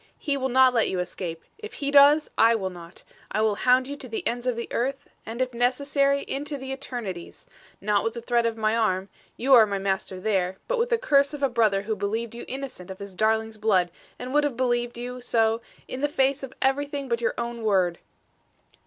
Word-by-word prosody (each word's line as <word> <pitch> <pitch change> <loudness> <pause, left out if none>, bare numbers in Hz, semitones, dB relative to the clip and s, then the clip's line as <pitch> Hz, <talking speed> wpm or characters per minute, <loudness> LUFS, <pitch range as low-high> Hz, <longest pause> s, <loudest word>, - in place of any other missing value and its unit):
He 285 -2 -1
will 265 -1 -1
not 260 0 +5
let 230 -2 +2
you 185 - -2
escape. 175 -2 -5 0.2
If 430 0 -8
He 280 -1 -2
does, 290 +2 +6
I 230 +1 +5
will 190 -4 -2
not. 170 0 -12 0.3
I 215 - -1
will 220 -1 +3
hound 255 +4 +3
you 285 - -5
to 255 - -9
the 225 - -4
ends 240 +1 -2
of 250 - +1
this 235 - -4
earth 270 +3 -2 0.2
and, 235 +3 -1
if 255 -1 -6
necessary, 280 +3 +1
into 285 +1 -4
the 265 0 -7
eternities. 240 -10 -6 0.3
Not 205 0 +1
with 225 +1 -2
the 235 - -5
threat 235 -1 +2
of 225 -1 -3
my 215 0 +1
arm 195 -4 0 0.3
you 265 +3 +3
are 225 -4 +8
my 200 -1 -2
master 190 -1 -2
there, 190 -2 0
but - - 0
with 475 +1 +1
the 470 - +3
curse 285 - +3
of 285 - -7
a 275 - +3
brother 215 -5 +2
who 220 +1 -2
believed 215 +3 -3
you 235 - -8
innocent 265 -9 -7
of 190 - -7
his 200 -1 -9
darling's 220 +1 0
blood 190 -5 +2 0.3
and 250 +1 -6
would 295 0 +4
have 285 -5 -1
believed 240 -2 0
you 250 +1 -6
so 225 -1 +1 0.3
in 255 - -6
face 275 -2 +1
of 270 -2 -7
everything 280 +1 0
but 235 -1 -1
your 230 - 0
own 235 0 -4
word." 185 -5 +1
235 Hz, 220 wpm, -25 LUFS, 215-270 Hz, 0.3 s, are